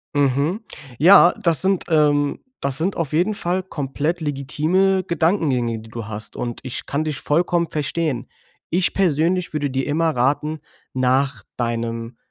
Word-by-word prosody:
Mhm. 145 - +1 0.4
Ja, 175 +2 +8
das 170 -6 +2
sind, 190 -1 +1
ähm 145 -2 +2 0.2
das 135 -1 -1
sind 180 +6 -1
auf 165 -5 -2
jeden 175 +7 +2
Fall 185 -1 -2
komplett 155 0 -3
legitime 155 +7 +1
Gedankengänge, 150 - +1
die 110 +1 -13
du 115 -1 -6
hast. 110 -1 -8
Und 120 -1 -4
ich 130 -2 -6
kann 145 +2 -1
dich 155 -3 -3
vollkommen 170 +2 +1
verstehen. 150 -4 -2 0.4
Ich 180 +1 +1
persönlich 175 0 +1
würde 145 -3 -1
dir 135 +1 -1
immer 160 +2 +1
raten, 145 +5 0 0.3
nach 130 +1 +1
deinem 115 0 -3
150 Hz, 145 wpm, -21 LUFS, 130-170 Hz, 0.4 s, Ja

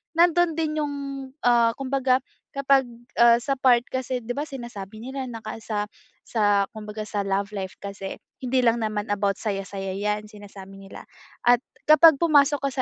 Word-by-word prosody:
nandun 345 0 +4
din 315 -2 -1
yung, 290 -1 -3 0.5
ah, 235 -1 +5
kumbaga 265 -1 +1 0.4
kapag, 275 -1 +3 0.4
ah, 235 0 +7
sa 275 +3 -1
part 250 -2 +4
kasi, 260 -1 -3
di 240 +1 -5
ba, 290 - -2
sinasabi 220 -6 -8
nila 265 +1 -5
naka 220 -1 -7
sa 210 -1 -2 0.4
sa 205 -3 +2
kumbaga 215 0 -6
sa 205 -2 -2
love 200 +1 0
life 190 -1 -5
kasi, 195 -1 -6 0.3
hindi 255 +1 +1
lang 235 0 +3
naman 215 0 -2
about 200 -1 +1
saya-saya 195 -2 -4
yan, 210 +1 -2
sinasabi 200 -2 -12
nila. 195 0 -11 0.4
At 245 -1 +6 0.3
kapag 310 -1 +7
pumasok 290 -3 +4
ka - - 0
230 Hz, 160 wpm, -24 LUFS, 205-270 Hz, 0.5 s, ah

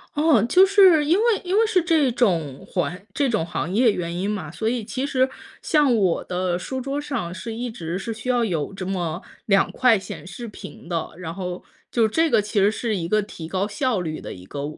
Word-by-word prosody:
哦， 295 -8 +4
就 370 +10 +6
是 380 -6 +6
因 335 +5 +3
为 440 - +2 0.2
因 370 +3 0
为 450 - +5
是 385 -5 +2
这 315 -7 +2
种 170 - 0
环 180 +2 -3
这 280 -3 +1
种 215 -8 0
行 175 +1 -3
业 235 +2 +4
原 170 -2 -3
因 190 +4 -2
嘛， 180 -8 -4
所 220 +5 -3
以 235 -1 0
其 260 +5 -3
实 260 -1 +2 0.3
像 295 -7 +3
我 190 -5 +2
的 180 -1 -1
书 260 +8 -4
桌 275 +2 -3
上 245 -12 -4
是 220 +5 -6
一 240 0 -4
直 170 -4 -4
是 225 +4 -4
需 225 +3 -9
要 245 -2 +2
有 175 -3 -2
这 190 -1 -6
么 175 -3 -2 0.2
2 195 -3 +3
块 250 -3 +4
显 185 -1 -8
示 225 +5 -7
屏 185 - -11
的， 165 -2 -2
然 165 -2 -6
后 180 -1 -5 0.3
就 225 -2 +2
这 325 +7 +2
个 215 - +4
其 210 0 -1
实 200 +2 +5
是 220 -1 -2
一 170 -2 -3
个 215 +3 +2
提 170 -5 -8
高 190 +3 -1
效 230 -2 -1
率 155 -2 -4
的 - - -7
一 90 0 -12
个 140 +4 -5
215 Hz, 240 characters per minute, -23 LUFS, 180-260 Hz, 0.3 s, 就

